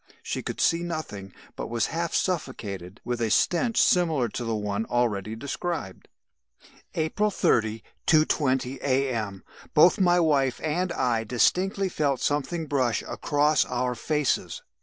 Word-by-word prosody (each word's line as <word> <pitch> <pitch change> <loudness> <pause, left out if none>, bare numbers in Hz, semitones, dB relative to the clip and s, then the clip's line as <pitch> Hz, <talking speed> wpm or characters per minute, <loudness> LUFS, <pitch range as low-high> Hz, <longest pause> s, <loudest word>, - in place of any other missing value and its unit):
She - - -3
could - - -5
see 170 0 +3
nothing, 155 - -5 0.2
but - - -5
was 115 0 0
half 170 +1 -1
suffocated 105 - -3
with 120 -1 -2
a 115 - +1
stench 215 - +2
similar 160 -9 +3
to 120 - -5
the 115 -1 -1
one 105 +1 -2
already 110 -3 0
described. 140 - -5 0.9
"April 165 +7 +1
30, 110 - +1 0.2
2.20 135 -4 +2
A.M. 125 -8 -1 0.3
Both 175 +7 +6
my 180 -2 +4
wife 140 -6 +2
and 175 +4 0
I 120 -3 0
distinctly 185 - +1
felt 145 -7 0
something 155 +3 -1
brush 130 -6 0
across 150 +1 +1
our 125 0 -1
faces. 150 +4 -1
135 Hz, 135 wpm, -26 LUFS, 115-165 Hz, 0.9 s, Both